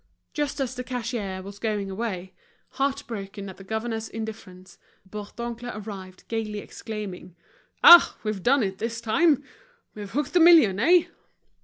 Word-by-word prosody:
Just 295 -1 -2
as 260 -2 -2
the 250 -1 -5
cashier 230 -7 -4
was 200 +1 -10
going 205 -3 -2
away, 190 -3 -4 0.4
heart 275 0 -1
broken 200 -2 -7
at 190 - -11
the 195 - -12
governor's 220 +2 -4
indifference, 190 -5 -9 0.3
Bourdoncle 235 +4 -7
arrived, 195 -3 -9
gaily 220 -2 -3
exclaiming: 205 -4 -7 0.5
"Ah! 345 0 +9
we've 215 -3 -3
done 260 +4 +3
it 190 -1 -3
this 230 +1 -3
time. 285 +6 +2 0.5
We've 205 -2 -8
hooked 285 +8 -2
the 355 - +5
million, 320 - +6
eh?" 340 +8 +5
220 Hz, 145 wpm, -25 LUFS, 195-245 Hz, 0.5 s, Ah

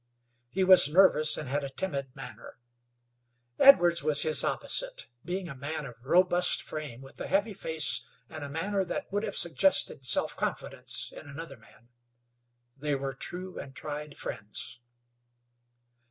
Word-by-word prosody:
He 190 +9 0
was 185 -5 +7
nervous, 155 -3 +5
and 150 - -5
had 140 +2 -1
a 140 - -4
timid 140 -3 -4
manner. 120 -4 -10 1.0
Edwards 175 -11 +7
was 150 -1 +1
his 155 - +3
opposite, - - -2 0.2
being 180 +1 -4
a 160 - -7
man 140 +3 -5
of 120 -2 -12
robust 180 +3 +3
frame, 145 -6 -7
with 135 0 -13
a - - -4
heavy 205 +3 +1
face, 160 -5 0 0.3
and 155 -2 -8
a 140 - -6
manner 190 +7 -1
that 185 - -5
would 205 - +1
have - - -4
suggested 165 -5 +1
self 125 - +2
confidence - - -3
in - - -10
another 165 +4 -8
man. 120 - -22 0.9
They 145 +1 -2
were 135 0 -4
true 185 +5 -5
and 135 -1 -9
tried 150 -1 -6
friends. 105 +3 -5
155 Hz, 150 wpm, -29 LUFS, 140-185 Hz, 1.0 s, was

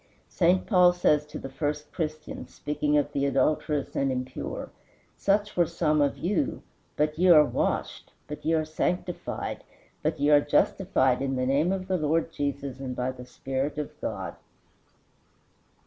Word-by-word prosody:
St. 180 +1 +2
Paul 180 -4 +5
says 150 -4 +2
to 150 - -7
the - - -6
first 150 +2 -4
Christians, 155 -2 -5
speaking 150 0 0
of 145 0 +1
the 140 0 0
adulterous 140 +2 0
and 135 -1 +1
impure, 130 0 -5 0.4
"Such 205 +1 +1
were 175 -2 +3
some 155 -2 +1
of 140 -1 +1
you, 185 +1 -1 0.3
but 150 +1 0
ye 185 - +4
are 155 -3 +8
washed, - - -2 0.2
but 150 - -7
ye 165 - +2
are 155 -1 +1
sanctified, 175 +3 -3 0.4
but 155 0 -1
ye 145 +1 +3
are 145 -1 +7
justified 145 -3 +2
in 135 -1 -1
the 130 0 0
name 140 +7 +2
of 190 -1 -3
the 190 -1 +1
Lord 160 +1 0
Jesus, 140 -3 -3
and 130 -2 -5
by 125 +1 -1
the 125 -1 -11
Spirit 135 +3 -3
of 150 - -3
God." - - -4
150 Hz, 165 wpm, -27 LUFS, 140-165 Hz, 0.4 s, are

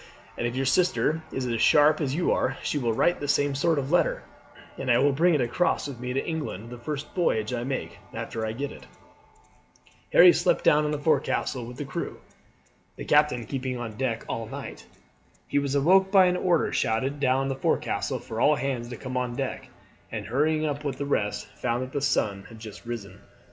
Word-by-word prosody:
"And 120 - -1
if 120 - -4
your 135 +1 0
sister 160 +1 +2
is 130 -1 -3
as 115 -2 -1
sharp 150 +4 +5
as 140 -2 -1
you 175 - +1
are 135 - 0
she 145 - -1
will 120 -3 0
write 175 +10 +2
the 145 - -4
same 145 0 +2
sort 160 +3 +1
of 140 +1 -2
letter, 175 - +2 0.5
and 135 - -5
I 120 - +5
will 140 +3 +4
bring 165 +5 +3
it 145 - +2
across 125 +7 0
with 135 -4 -8
me 125 0 -4
to 135 +2 -1
England 135 - -4
the 125 - -8
first 145 +4 -5
voyage 110 - 0
I 120 -1 -2
make 130 +1 -4
after 115 - -5
I 110 0 -2
get 140 +4 -4
it." - - -13 1.2
Harry 175 0 +8
slept 175 +1 +1
down 150 0 +4
in 150 - -1
the 150 - -1
forecastle 145 -4 0
with 125 +1 -9
the 145 - -4
crew, 135 - -5 0.8
the - - -7
captain 150 -5 +3
keeping 130 +1 -3
on 115 -3 -6
deck 125 -2 -2
all 115 -1 -4
night. - - -8 0.6
He 145 - +1
was 140 0 -2
awoke 190 +7 +4
by 190 -2 +7
an 180 0 +2
order 180 -2 +1
shouted 130 +6 0
down 135 0 +2
the 135 - -2
forecastle 135 - -1
for 110 0 -6
all 150 - +5
hands 130 -4 -3
to 120 - -7
come 130 -1 -6
on 125 -1 -1
deck; 135 +1 -4 0.4
and - - -4
hurrying 155 +6 +1
up 145 -1 -3
with 140 -3 -3
the 140 - -3
rest 105 -7 -1 0.2
found 120 +1 0
that 130 - -8
the 140 - -2
sun 100 -7 0
had 115 - -12
just 110 +1 -11
risen. 115 -4 -7
135 Hz, 210 wpm, -26 LUFS, 120-150 Hz, 1.2 s, Harry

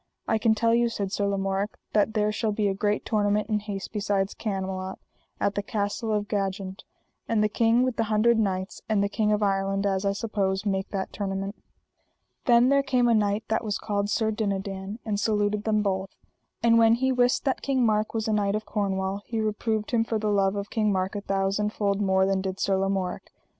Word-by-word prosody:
I 220 - +2
can 220 0 +3
tell 230 +1 +2
you, 235 0 +3
said 200 -4 -3
Sir 200 0 0
Lamorak, 195 +1 -1 0.2
that 215 +1 +2
there 210 0 +2
shall 215 0 -1
be 205 0 0
a 195 - +1
great 205 +1 -1
tournament 210 -1 +1
in 210 -1 +1
haste 205 -2 -6
beside 200 -2 0
Camelot, 190 -2 -3 0.4
at 200 - +1
the 205 - -1
Castle 205 +1 -2
of 210 -1 0
Jagent; 195 -1 -3 0.4
and 220 -2 +2
the - - +4
King 230 +3 +3
with 255 -2 -1
the 225 - +1
Hundred 220 +2 +3
Knights 190 -2 -2
and 210 -2 +2
the - - +2
King 210 0 +1
of 210 0 +1
Ireland, 195 0 0
as 195 -1 0
I 200 0 +1
suppose, 200 -2 -1
make 195 -1 -1
that 195 -2 -4
tournament. 195 0 -3 0.9
Then 240 0 +5
there 280 0 +4
came 255 -3 +2
a 235 - +4
knight 210 0 +1
that 220 - 0
was 210 -3 -1
called 205 -1 -2
Sir 220 +1 +1
Dinadan, 195 -1 -3
and 210 -2 -1
saluted 210 -1 0
them 215 -1 +2
both. 190 -1 -1 0.5
And 230 0 +5
when 225 0 +6
he 260 +2 +1
wist 250 +1 +2
that 270 - 0
King 265 -3 +1
Mark 215 0 +1
was 220 -1 -1
a 220 - +1
knight 205 -1 +1
of 215 - -3
Cornwall 195 -1 -1
he 230 -2 -2
reproved 215 0 -1
him 230 -2 +3
for 225 -1 -1
the 215 -1 0
love 195 -1 +2
of 200 0 -4
King 215 -2 +1
Mark 190 +1 -1
a 205 - -3
thousand 195 +2 0
fold 200 -1 0
more 190 -1 +3
than 195 0 +1
did 190 0 -4
Sir 195 - +2
Lamorak. 195 -1 -2
205 Hz, 215 wpm, -26 LUFS, 195-220 Hz, 0.9 s, when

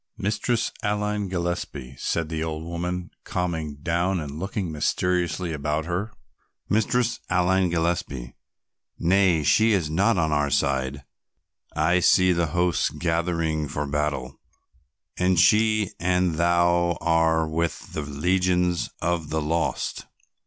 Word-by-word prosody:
"Mistress 110 +3 0
Aline 105 -1 -1
Gillespie," 85 -7 -4
said 85 -2 -1
the 80 -1 -2
old 80 -1 -4
woman 85 +1 -4
calming 80 -4 -3
down 90 +2 0
and 75 -1 -6
looking 95 -1 -3
mysteriously 90 +2 0
about 75 +1 -2
her. 90 +6 -3 0.6
"Mistress 115 +2 +1
Aline 90 0 +2
Gillespie, 80 -7 -2 0.6
nay, 90 -3 +3
she 110 +9 +4
is 85 -6 0
not 100 +6 +2
on 80 -2 +1
our 75 -1 +1
side. 70 0 0 0.7
I 85 +4 +3
see 90 +1 +5
the 85 -1 +1
hosts 85 +1 +1
gathering 85 -2 -1
for 75 +1 -3
battle 70 -3 -2 0.8
and 90 -1 +2
she 105 +2 +4
and 90 0 +1
thou 85 +1 +2
are 80 -1 +2
with 80 +1 -3
the 80 - -2
legions 90 +4 0
of 85 -2 -1
the 80 - 0
lost. 80 +2 -2
85 Hz, 125 wpm, -25 LUFS, 80-90 Hz, 0.8 s, see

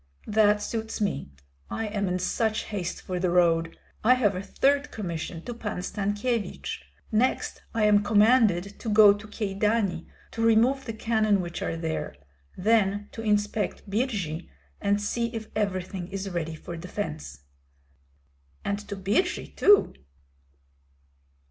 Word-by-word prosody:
"That 210 -1 +3
suits 225 -1 -4
me; 195 - -1 0.4
I 225 - -3
am 205 -2 -1
in 180 0 0
such 215 +4 0
haste 185 -4 -4
for 180 -1 -3
the 180 0 +1
road. 165 -2 +2 0.3
I 250 +4 +6
have 215 -6 +2
a 185 - -3
third 280 +7 +1
commission 170 -4 -5
to 240 - -5
Pan 225 -3 -5
Stankyevich. 205 - -2 0.3
Next 235 +4 0
I 225 - +2
am 210 -1 +5
commanded 210 -4 +3
to 230 - -4
go 210 -1 +8
to 205 +1 -9
Kyedani, 205 -3 -1 0.2
to 225 - -4
remove 230 +4 +3
the 225 - -4
cannon 215 -2 +2
which 175 -1 -4
are 165 - -2
there; 160 - -3 0.4
then 205 0 +2
to 225 - -7
inspect 210 -1 0
Birji 200 - -2 0.3
and 200 0 +2
see 235 +3 -1
if 220 -1 -5
everything 185 -3 -2
is 195 0 -5
ready 165 -2 -3
for 170 +2 -8
defence." 165 - -6 1.2
"And 200 0 -1
to 200 - -3
Birji 205 - -1
too?" 410 0 +5
205 Hz, 140 wpm, -27 LUFS, 180-220 Hz, 1.2 s, go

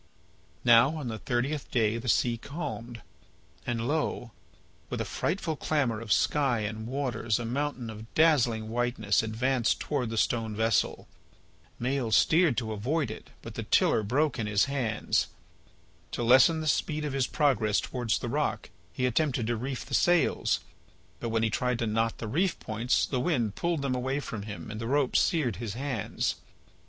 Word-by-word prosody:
Now 120 +5 +6
on 145 -6 -4
the 110 -1 -5
thirtieth 130 +5 -2
day 115 -1 +1
the 125 +1 -4
sea 120 +2 +3
calmed. 120 -3 -6 0.6
And 120 -1 -1
lo! 145 -5 -1 0.6
with - - -3
a - - -1
frightful 170 -3 -2
clamour 135 -8 0
of 115 -2 -6
sky 135 -4 +2
and 110 +1 -4
waters 120 -4 -1
a 120 - -4
mountain 130 0 -2
of 110 +1 -11
dazzling 125 -9 +3
whiteness 120 -3 +1
advanced 115 +2 0
towards 135 -6 -2
the 115 - -4
stone 110 -1 0
vessel. 110 0 +1 0.7
Maël 125 -1 -1
steered 160 0 +4
to 110 -2 -2
avoid 125 +5 -1
it, - - -10
but - - -8
the - - -4
tiller - - +3
broke 130 +7 0
in 110 - -1
his 105 -1 +3
hands. 130 -6 0 0.9
To 120 - -2
lessen 130 +7 +6
the 155 - -3
speed 150 +1 0
of 145 - -3
his 135 -2 +1
progress 115 -9 +2
towards 120 -5 -1
the - - -5
rock - - -2 0.2
he 125 - -1
attempted 125 -1 +1
to 120 +1 0
reef 125 +3 -4
the - - -9
sails, 175 -1 +2 0.6
but 115 - -3
when 115 0 +1
he 110 - +1
tried 125 +1 0
to 115 - -1
knot 115 +1 0
the 115 - -5
reef 170 - 0
points 115 +3 0
the 130 - -2
wind 125 - 0
pulled 170 0 -1
them 135 -2 0
away 130 +2 -1
from 115 -7 -5
him 105 +1 -7
and 105 +1 -6
the 115 - -3
rope 140 0 +1
seared 140 - +2
his 115 -2 -5
hands. 130 -4 -2
120 Hz, 175 wpm, -28 LUFS, 110-140 Hz, 0.9 s, Now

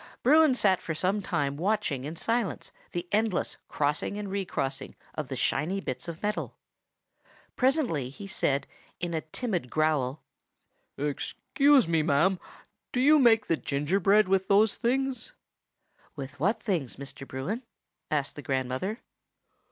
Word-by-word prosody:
Bruin 305 0 +6
sat 190 -6 +3
for 160 - -4
some 190 +6 0
time 140 -6 -1
watching 175 -7 0
in 155 +3 -5
silence 230 +3 -1 0.2
the 175 0 -4
endless 215 -3 0
crossing 150 +7 -1
and 205 -2 -5
re 200 0 -1
crossing 135 -6 -3 0.2
of - - -4
the - - -4
shining 170 +8 0
bits 130 -6 -4
of 170 -1 -5
steel. 210 +1 -2 1.0
Presently 250 - +1
he 170 +9 -10
said 140 -7 0 0.3
in 175 -1 -3
a 160 - 0
timid 175 - -3
growl,— 150 -3 0 0.7
"Excuse 260 - +2
me, 165 -1 +2
ma'am; 170 +5 +2 0.5
do 250 - -1
you 295 +4 +6
make 230 -4 +5
the 165 - +1
gingerbread 185 +10 +2
with 190 0 +2
those 205 +1 +4
things?" 265 - -1 0.8
"With 140 -1 -8
what 200 - +1
things, 170 - -1
Mr. 135 0 -8
Bruin?" 150 - -3 0.5
asked 145 -2 -1
the 145 - -7
grandmother. 130 - -2
180 Hz, 140 wpm, -28 LUFS, 145-215 Hz, 1.0 s, Bruin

